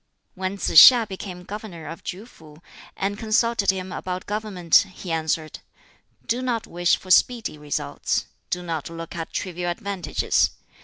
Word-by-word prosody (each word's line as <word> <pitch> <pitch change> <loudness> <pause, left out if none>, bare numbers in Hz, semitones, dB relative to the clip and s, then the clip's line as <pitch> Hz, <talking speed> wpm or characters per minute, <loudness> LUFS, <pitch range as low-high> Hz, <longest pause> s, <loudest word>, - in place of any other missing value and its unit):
When 190 +1 -4
Tsz - - -1
hiŠ 240 -4 +9
became 185 -2 -7
governor 195 -4 -8
of 165 +2 -8
KŁ 200 +6 -6
fu, 155 -9 -17 0.4
and 200 +2 -2
consulted 225 -1 +1
him 190 -1 -1
about 185 0 -5
government, 205 -6 +2 0.2
he 180 - -7
answered, 160 -1 -2 0.7
"Do 240 +2 -1
not 240 -3 -1
wish 175 +1 +1
for 185 - -8
speedy 230 -1 +3
results. 150 -1 -2 0.2
Do 180 0 -2
not 165 -3 -4
look 165 0 -8
at 165 -1 -5
trivial 180 -1 -3
advantages. 180 -2 0
185 Hz, 150 wpm, -23 LUFS, 165-210 Hz, 0.7 s, hiŠ